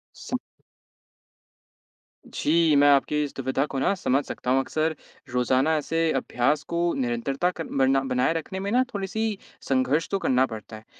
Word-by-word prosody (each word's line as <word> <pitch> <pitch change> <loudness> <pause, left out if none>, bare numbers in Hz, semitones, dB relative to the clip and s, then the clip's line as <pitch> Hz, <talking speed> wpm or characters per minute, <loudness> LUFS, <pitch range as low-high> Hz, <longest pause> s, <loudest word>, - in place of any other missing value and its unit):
सम - - -4 1.9
जी, 160 0 +2
मैं 145 0 +6
आपकी 145 +1 +3
इस 145 - -5
दुविधा 135 +1 -1
को 140 -2 -4
ना 165 - +2
समझ 140 -6 +1
सकता 125 - -3
हूँ। 135 - +4
अक्सर 155 +4 -1 0.4
रोज़ाना 130 +5 +2
ऐसे 165 +2 0
अभ्यास 135 +3 0
को 170 0 +1
निरंतरता 130 +6 -1
कर 165 -3 -6
बरना 135 0 +4
बनाए 130 +3 +1
रखने 165 +3 -4
में 195 +1 -3
ना 250 +2 +4
थोड़ी-सी 210 +2 -2 0.3
संघर्ष 135 +4 +1
तो 195 - 0
करना 130 -6 +3
पड़ता 110 -2 -9
है। 110 - -16
145 Hz, 160 wpm, -25 LUFS, 130-165 Hz, 1.9 s, मैं